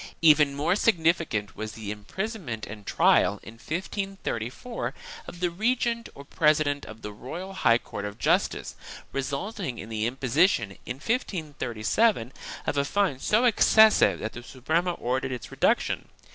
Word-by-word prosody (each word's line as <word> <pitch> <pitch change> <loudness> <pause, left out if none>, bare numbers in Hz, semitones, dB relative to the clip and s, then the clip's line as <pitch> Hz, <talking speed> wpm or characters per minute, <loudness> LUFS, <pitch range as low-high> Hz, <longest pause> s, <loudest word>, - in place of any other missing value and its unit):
Even 150 -3 +6
more 155 +6 +1
significant 165 - +1
was 110 -1 -5
the 105 -1 -6
imprisonment 125 - -5
and 105 -1 -10
trial, 100 +3 +3
in 110 - -10
1534, 195 - -4 0.3
of 175 - -9
the 175 -1 +1
regent 235 +4 0
or 140 - -11
president 150 -1 +1
of 110 +1 -11
the 105 - -5
royal 170 - -7
high 115 -11 +4
court 100 -4 -7
of 105 +1 -5
justice, - - +1 0.4
resulting 140 - -3
in 110 - -8
the 110 0 -1
imposition, 130 - +2 0.2
in 120 - -3
1537, 150 - 0 0.3
of 145 - -1
a 140 - +3
fine 170 -3 0
so 215 - +2
excessive 220 -1 +6
that 110 - -5
the 120 - -7
Suprema 160 +8 -1
ordered 130 -2 -2
its 125 -3 -6
reduc - - +3
tion. - - -4
145 Hz, 145 wpm, -27 LUFS, 115-190 Hz, 0.4 s, Even